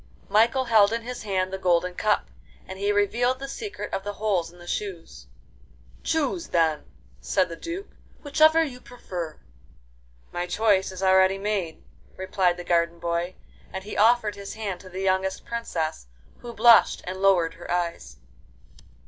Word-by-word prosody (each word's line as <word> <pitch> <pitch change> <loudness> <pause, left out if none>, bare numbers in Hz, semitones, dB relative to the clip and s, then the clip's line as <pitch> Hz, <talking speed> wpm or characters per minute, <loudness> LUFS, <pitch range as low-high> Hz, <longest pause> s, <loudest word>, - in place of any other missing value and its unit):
Michael 235 +5 +3
held 220 -3 +5
in 230 0 -2
his 250 +1 -6
hand 190 -2 -1
the 190 - -3
golden 180 -1 +2
cup, 210 +3 0 0.4
and 190 0 -8
he 200 +1 +1
revealed 235 +5 +1
the 275 +1 -6
secret 410 +9 -6
of 195 - -2
the 205 0 -4
holes 200 -6 -1
in 175 - -18
the 175 - -13
shoes. 170 - -5 0.7
'Choose, 320 +2 -1
then,' 160 -3 +1 0.3
said 185 -2 +1
the 165 - -6
Duke, 345 - -6 0.3
'whichever 315 +2 +5
you 250 -5 -6
prefer.' 175 -11 -7 0.9
'My 175 0 -3
choice 195 0 +2
is 185 0 -7
already 190 0 +4
made,' 195 -5 -3 0.3
replied 185 -1 +1
the 175 - -6
garden 170 -1 +1
boy, 170 +1 -2 0.4
and 190 - -5
he 210 - -7
offered 220 0 +4
his 200 0 -8
hand 200 -5 -4
to 185 - -12
the 185 +1 -6
youngest 190 0 0
Princess, 165 - -3 0.3
who 240 - -8
blushed 235 0 +5
and 185 +1 -5
lowered 185 -4 +3
her 175 - -12
eyes. 170 - -2
190 Hz, 160 wpm, -25 LUFS, 175-225 Hz, 0.9 s, held